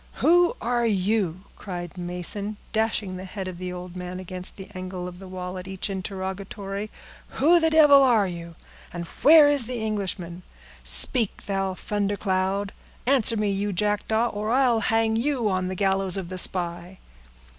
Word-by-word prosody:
"Who 350 +1 +3
are 240 +1 +1
you?" 195 -3 0 0.2
cried 175 -3 -7
Mason, 180 +4 -3 0.2
dashing 220 -4 -1
the 185 - -7
head 190 0 -6
of 180 -2 -7
the 180 0 -4
old 180 0 -8
man 180 0 -6
against 185 0 -6
the 195 - -9
angle 185 -1 -6
of 180 0 -10
the 190 - -10
wall 185 0 -6
at 180 - -9
each 190 +1 -4
interrogatory. 195 +1 -5 0.5
"Who 335 +5 +5
the 320 -1 +3
devil 295 -3 +7
are 235 -6 +4
you, 170 -2 -7 0.4
and 175 -1 -5
where 300 - +6
is 285 -5 +2
the 250 -1 -4
Englishman? 190 -5 -3 0.4
Speak, 235 -6 +2
thou 195 -1 -1
thundercloud! 200 0 -1 0.3
Answer 245 -4 +4
me, 210 -1 0
you 200 +1 -1
jackdaw, 210 +4 0
or 210 0 -4
I'll 250 -2 +3
hang 225 +1 +1
you 250 -2 0
on 185 -1 -1
the 185 - -4
gallows 195 -1 0
of 185 -3 -5
the 185 0 0
spy!" 175 0 0
195 Hz, 165 wpm, -25 LUFS, 185-220 Hz, 0.5 s, devil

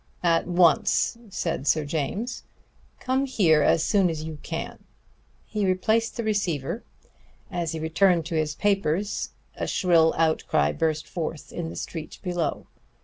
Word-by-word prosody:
"At 165 -1 +2
once," 175 +5 +3
said 165 -6 -3
Sir 155 -2 +3
James. 165 - -3 0.6
"Come 265 +2 0
here 170 - +4
as 160 - +3
soon 195 -2 +3
as 155 -2 -4
you 155 -1 -6
can!" - - -5 0.6
He 210 -1 -2
replaced 220 +6 +1
the 235 - -2
receiver. 205 - -1 0.7
As 170 -3 -2
he 160 0 -3
turned 175 -1 +3
to 170 - -5
his 155 -1 0
papers 200 0 0 0.2
again - - -6
a - - -6
shrill 165 -3 +3
outcry 160 - +2
burst 155 - -1
forth 160 -3 -5
in 170 -2 -4
the - - -8
street 160 -2 -6
below. 175 -4 -2
170 Hz, 145 wpm, -25 LUFS, 155-195 Hz, 0.7 s, here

